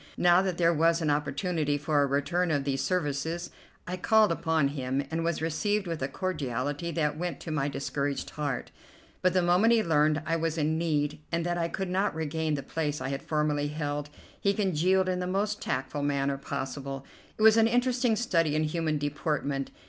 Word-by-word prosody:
Now 175 +1 +5
that 185 -3 -2
there 170 -1 +4
was 165 +1 +3
an 155 -3 +1
opportunity 145 +1 0
for 145 0 +1
a 140 - +3
return 170 +6 0
of 145 -3 +1
these 135 -1 -1
services, 165 0 -1 0.3
I 180 +1 -4
called 215 +2 +4
upon 160 -3 +1
him, 135 0 -2
and 165 +1 -1
was 170 -1 -1
received 205 +6 0
with 165 -4 -4
a 130 - 0
cordiality 145 -2 -3
that 150 -1 0
went 180 0 -3
to 165 - -5
my 145 -2 0
discouraged 140 0 -3
heart; 145 -4 -3 0.5
but 185 -1 +3
the 185 -1 +3
moment 180 +7 +4
he 225 -2 +3
learned 155 -2 +2
I 165 +1 +1
was 165 0 -1
in 160 +1 +1
need, 150 -2 0
and 170 0 0
that 175 0 -1
I 165 - +1
could 190 +1 -4
not 190 -1 +1
regain 160 0 -1
the 140 - -4
place 150 0 -2
I - - -3
had 135 0 -3
formerly 150 -1 0
held, 145 -1 -3 0.3
he 200 0 +1
congealed 190 -1 +2
in 180 -1 0
the 180 - -2
most 205 +3 -1
tactful 135 +3 -2
manner 140 -1 0
possible. 135 0 -5 0.3
It 215 - -1
was 220 0 +8
an 225 0 +5
interesting 245 0 +2
study 165 -9 +1
in 155 - +2
human 155 0 0
deportment. 145 -1 -2
160 Hz, 195 wpm, -28 LUFS, 145-180 Hz, 0.5 s, was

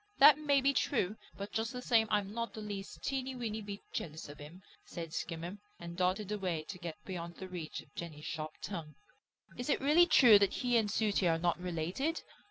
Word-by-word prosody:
"That 295 +1 +9
may 285 -2 +3
be 275 +1 +3
true, 215 -8 +1 0.2
but 200 +1 -6
just 225 +1 -1
the 250 - -4
same 225 -3 +4
I'm 205 -1 0
not 230 0 -3
the - - -6
least 205 -2 -6
teeny 265 -1 -2
weeny 220 -3 -3
bit 200 -1 -7
jealous 155 -2 -5
of 145 +1 -10
him," 160 +6 -11 0.2
said 165 -2 -7
Skimmer, 170 +4 -4 0.2
and 170 0 -7
darted 185 +3 0
away 185 -6 -1
to 185 - -6
get 170 -3 -5
beyond 170 -2 -5
the 190 - -7
reach 175 -4 -5
of 140 - -22
Jenny's 155 -3 -7
sharp 155 -1 -4
tongue. 165 -6 -5 0.6
"Is 245 +3 -4
it - - +3
really 305 +6 +5
true 245 -10 +8
that 200 -2 +2
he 245 -1 0
and 220 -3 +3
Sooty 205 -3 +2
are 165 -1 +3
not 175 +1 +1
related?" 180 - -2
200 Hz, 205 wpm, -33 LUFS, 170-235 Hz, 0.6 s, That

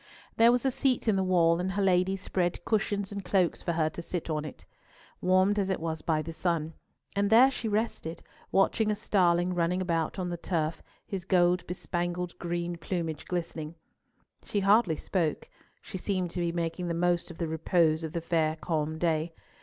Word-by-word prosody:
There 230 +1 +6
was 245 +2 +1
a 265 - +3
seat 255 -2 0
in 215 - +4
the 190 - +1
wall, 170 -2 +3
and 185 +1 -2
her 200 - 0
ladies 190 0 +2
spread 175 -3 -1
cushions 205 -2 0
and 200 -1 -5
cloaks 180 -1 +1
for 170 - -1
her 160 -1 +1
to 170 - -6
sit 170 -1 -4
on 155 -1 -2
it, 150 - -10 0.6
warmed 185 +3 +3
as 195 -1 0
it 190 - 0
was 160 -1 -3
by 155 -2 0
the 165 +2 -6
sun; 165 -1 -1 0.4
and 200 0 +2
there 245 +5 +7
she 245 - -4
rested, 210 -6 -2 0.3
watching 215 +3 +2
a 210 - +1
starling 180 -3 +2
running 175 +1 +1
about 165 -3 -1
on 180 -2 -2
the 175 - -3
turf, 165 -2 -2 0.2
his 190 -3 -5
gold 180 -1 +2
bespangled 175 0 -3
green 175 0 -3
plumage 165 -3 -3
glistening. 165 -3 -4 0.7
She 205 - -1
hardly 200 -3 +4
spoke; 170 - -2 0.4
she 190 - -7
seemed 185 -3 -1
to 180 - -4
be 170 -1 0
making 170 +1 -2
the 170 - -1
most 175 0 +1
of 170 - -10
the 170 - -2
repose 160 0 +2
of 160 - -5
the 170 - -2
fair 160 -2 +1
calm 160 -1 -2
day. 160 0 0
175 Hz, 195 wpm, -29 LUFS, 165-190 Hz, 0.7 s, there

